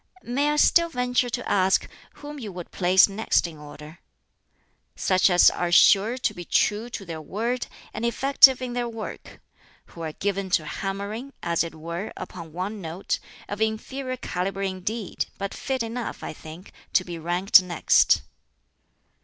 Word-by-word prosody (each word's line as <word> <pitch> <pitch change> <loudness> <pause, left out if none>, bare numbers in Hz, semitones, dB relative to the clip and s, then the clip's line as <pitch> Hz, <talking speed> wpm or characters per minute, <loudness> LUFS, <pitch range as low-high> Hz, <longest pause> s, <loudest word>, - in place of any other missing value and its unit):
'" - - -35
"May 275 +5 0
I 295 - +1
still 335 +3 +4
venture 250 -3 0
to - - -4
ask 190 -1 +2 0.3
whom 295 0 -9
you 215 -5 -6
would 175 -2 -9
place 185 0 +5
next 205 0 +1
in 160 -3 -8
order?" 150 +2 -12 1.0
"Such 185 0 +3
as 180 -1 +6
are 175 -1 -2
sure 205 +7 +5
to 255 - -1
be 175 - -8
true 215 +6 +1
to 210 -4 -7
their 165 -2 -6
word, 230 +10 -3 0.3
and - - -5
effective 265 +2 +5
in 245 -1 -4
their 240 -1 -2
work 225 -1 -8 0.4
who 170 - -12
are 160 -2 -4
given 195 +1 -2
to 155 - -11
hammering, 200 - -5
as 170 -1 +1
it 165 -1 -7
were, 170 +5 -6
upon 170 -3 -8
one 190 +5 -5
note 170 +3 -3 0.3
of 205 +1 -6
inferior 255 +4 -2
calibre 195 -3 -3
indeed, 190 +2 -4
but 200 0 -4
fit 265 -3 -2
enough, 230 +1 -5
I - - -5
think, 160 +5 -12 0.2
to 185 - +4
be 175 -2 -6
ranked 175 +4 +5
next." 175 - +3
195 Hz, 165 wpm, -25 LUFS, 175-240 Hz, 1.0 s, as